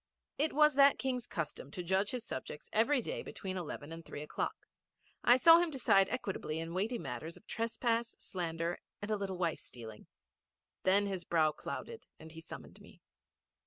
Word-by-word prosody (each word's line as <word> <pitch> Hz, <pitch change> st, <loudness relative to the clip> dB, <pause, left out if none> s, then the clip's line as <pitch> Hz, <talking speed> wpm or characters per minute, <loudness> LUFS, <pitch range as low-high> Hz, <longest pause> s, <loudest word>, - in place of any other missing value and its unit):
It 310 Hz, +2 st, +2 dB
was 300 Hz, 0 st, +6 dB
that 280 Hz, +1 st, +6 dB
King's 250 Hz, -2 st, -2 dB
custom -, -, -4 dB
to 180 Hz, -4 st, -5 dB
judge 190 Hz, +3 st, +1 dB
his 245 Hz, -2 st, -3 dB
subjects 150 Hz, 0 st, -6 dB
every 245 Hz, +4 st, +3 dB
day -, -, -3 dB
between 190 Hz, -1 st, -5 dB
eleven 160 Hz, -4 st, -5 dB
and 165 Hz, 0 st, -7 dB
three 145 Hz, -, -7 dB
o'clock. 150 Hz, -, -3 dB, 0.6 s
I 245 Hz, +1 st, +7 dB
saw 330 Hz, +5 st, +9 dB
him 345 Hz, -1 st, +2 dB
decide 200 Hz, -9 st, +4 dB
equitably 195 Hz, -10 st, -3 dB
in 165 Hz, +1 st, -4 dB
weighty 210 Hz, +7 st, 0 dB
matters 140 Hz, -, -5 dB
of -, -, -19 dB
trespass, 230 Hz, 0 st, -1 dB
slander, 170 Hz, -2 st, -3 dB, 0.2 s
and 210 Hz, -, -3 dB
a -, -, +3 dB
little 195 Hz, -2 st, -3 dB
wife 170 Hz, -3 st, 0 dB
stealing. 110 Hz, -3 st, -10 dB, 0.7 s
Then 195 Hz, +2 st, +4 dB
his 190 Hz, -3 st, -3 dB
brow 160 Hz, -2 st, +3 dB
clouded 455 Hz, -, -7 dB
and 160 Hz, 0 st, -11 dB
he 165 Hz, 0 st, -10 dB
summoned -, -, -10 dB
me. -, -, -17 dB
195 Hz, 175 wpm, -34 LUFS, 165-240 Hz, 0.7 s, saw